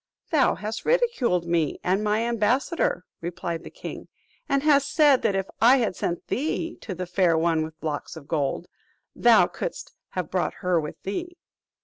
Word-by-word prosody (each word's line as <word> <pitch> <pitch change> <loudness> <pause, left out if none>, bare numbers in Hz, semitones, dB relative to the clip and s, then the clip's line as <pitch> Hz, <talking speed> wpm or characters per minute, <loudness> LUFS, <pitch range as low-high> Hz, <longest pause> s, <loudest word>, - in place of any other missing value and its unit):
"Thou 300 -5 +3
hast 215 +1 -5
ridiculed 460 - +1
me 170 -3 0
and 190 +3 +1
my 210 +1 +1
ambassador," 235 - 0 0.2
replied 170 -1 -4
the - - -8
king; - - -8 0.4
"and 275 0 +2
hast 280 -2 +3
said, 290 -3 +5
that 205 -3 +1
if 195 -1 0 0.2
I 245 +4 +7
had 225 -7 0
sent 170 0 -3
thee 325 +4 -2
to 190 - -6
the 180 +1 -4
Fair 175 -2 +2
One 165 -1 +2
with 155 0 -7
Locks 150 0 -4
of 150 -3 -11
Gold, 150 +1 -1 0.5
thou - - +6
couldst - - -6 0.2
have - - -3
brought - - -1
her 180 -2 +3
with 150 - -7
thee." 345 - -4
205 Hz, 170 wpm, -25 LUFS, 170-275 Hz, 0.5 s, I